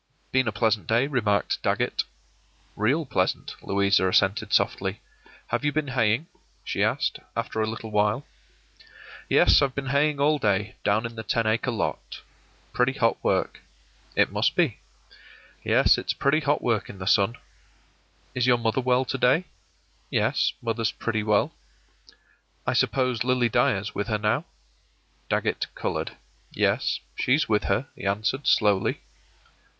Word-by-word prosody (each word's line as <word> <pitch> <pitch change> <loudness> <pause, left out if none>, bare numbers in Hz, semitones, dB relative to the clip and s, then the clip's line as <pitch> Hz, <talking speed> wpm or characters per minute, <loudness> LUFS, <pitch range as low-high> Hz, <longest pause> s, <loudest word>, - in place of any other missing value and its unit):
“Been 130 -2 +2
a - - +1
pleasant 105 -4 0
day,” 115 +4 +3
remarked 110 -8 0
Dagget. - - 0 0.7
“Real 135 +10 +1
pleasant,” 95 -8 -1
Louisa 100 -1 +2
assented, 95 +2 +2
softly. - - +1 0.5
“Have 120 +4 -1
you 145 - +2
been 150 -1 -2
haying?” 120 +2 +1 0.4
she - - -1
asked, - - 0 0.2
after 115 -1 -2
a 110 - 0
little 110 0 -6
while. 105 +5 +1 1.0
“Yes, - - +5
I've 135 -2 0
been 135 -1 -3
haying 145 0 +2
all 150 +1 +3
day, 105 -3 0
down 105 +3 +1
in 115 - -5
the 110 - -5
ten 115 +1 -1
acre 110 +4 +1
lot. 115 - -3 0.5
Pretty 125 +1 +2
hot 115 -4 0
work.” - - 0 0.5
“It - - +3
must - - +1
be.” - - +1 0.8
“Yes, - - +4
it's - - -2
pretty 140 +3 +2
hot 145 -1 0
work 115 -4 0
in 100 - -9
the 95 - -7
sun.” 100 +4 +3 1.0
“Is 125 0 0
your 125 -1 +5
mother 115 +2 0
well 125 +1 +2
to 135 +2 -3
day?” 135 +10 +3 0.6
“Yes, - - +1
mother's 115 -1 -1
pretty 115 -2 -2
well.” 105 -1 +1 1.1
“I - - 0
suppose 125 -4 +1
Lily 125 -1 +2
Dyer's 105 -1 +1
with 100 +1 -3
her 110 -2 0
now?” 105 0 0 0.8
Dagget - - 0
colored. - - -3 0.3
“Yes, - - 0 0.2
she's 140 +5 +2
with 105 -1 +1
her,” 130 +5 0
he - - -5
answered, 110 +8 -1
slowly. 105 -3 +2
115 Hz, 145 wpm, -25 LUFS, 105-130 Hz, 1.1 s, Yes